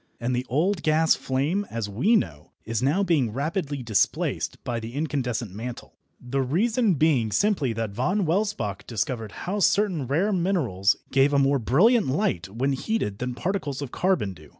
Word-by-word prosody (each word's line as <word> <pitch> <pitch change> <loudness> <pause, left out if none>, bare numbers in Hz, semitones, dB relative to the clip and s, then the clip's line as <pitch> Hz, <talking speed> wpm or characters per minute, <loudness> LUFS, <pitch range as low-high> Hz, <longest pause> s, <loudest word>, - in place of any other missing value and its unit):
And 125 +1 -1
the 125 +1 -3
old 170 +7 +1
gas 155 +1 +3
flame, 150 +10 -1
as 115 -3 -3
we 125 - +2
know, 75 - -2
is 115 0 -2
now 145 +10 +2
being 150 - +1
rapidly 145 - -3
displaced 110 -4 0
by 120 -1 -2
the 115 +2 -8
incandescent 125 - -2
mantle, 115 +4 -7 0.3
the 135 +2 -2
reason 205 - +1
being 135 -7 +2
simply 155 - +1
that 110 -2 -3
Von 180 - 0
Welsbach 165 - -1
discovered 115 -1 -3
how 200 +4 -1
certain 185 -8 +2
rare 175 - +1
minerals 150 - +1 0.2
gave 135 +2 +3
a - - +4
more 140 0 +3
brilliant 195 - +4
light 130 - -1
when 130 +7 -1
heated 135 - -2
than 125 0 -3
particles 150 -1 -2
of 140 -4 -5
carbon 180 - 0
do. 75 -4 -16
135 Hz, 170 wpm, -25 LUFS, 115-180 Hz, 0.3 s, a